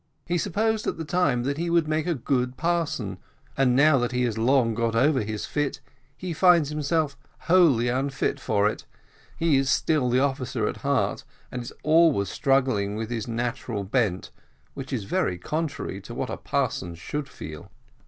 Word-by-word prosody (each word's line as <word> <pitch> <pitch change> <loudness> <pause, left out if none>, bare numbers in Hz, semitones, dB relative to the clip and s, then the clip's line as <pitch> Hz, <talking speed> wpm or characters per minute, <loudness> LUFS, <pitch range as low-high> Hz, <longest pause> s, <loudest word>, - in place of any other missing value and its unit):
He 175 0 0
supposed 215 +3 0
at - - -1
the 160 - -5
time 150 -7 +1
that 140 +3 -2
he 170 0 -1
would 170 -2 +2
make 155 +1 0
a 170 - +1
good 125 -1 -1
parson, 160 - -1 0.4
and 130 -2 +3
now 145 0 +5
that 120 0 -1
he 125 0 +1
has 120 -3 0
long 115 0 +3
got 115 0 -1
over 135 +3 +3
his 105 0 -4
fit, 145 -2 -2 0.4
he 180 -2 -4
finds 170 -3 +4
himself 150 0 0 0.3
wholly 165 -10 +4
unfit 135 +2 -1
for 105 -4 +1
it 105 - -4 0.5
he 160 -4 +3
is 135 0 +1
still 145 -1 +2
the 125 +1 +3
officer 135 -2 -1
in - - -1
heart, - - -1 0.3
and 125 - -4
is 120 - -8
always 155 - +4
struggling 130 -8 +1
with 110 +1 -4
his 115 -2 -3
natural 120 -2 -3
bent, 100 -3 -1 0.4
which 135 -1 -7
is 125 -6 -2
very 90 -2 -1
contrary 145 - -3
to - - -9
what - - -3
a - - -4
parson 85 -1 -2
should 140 - -5
feel." 75 -8 -9
135 Hz, 180 wpm, -25 LUFS, 115-155 Hz, 0.5 s, now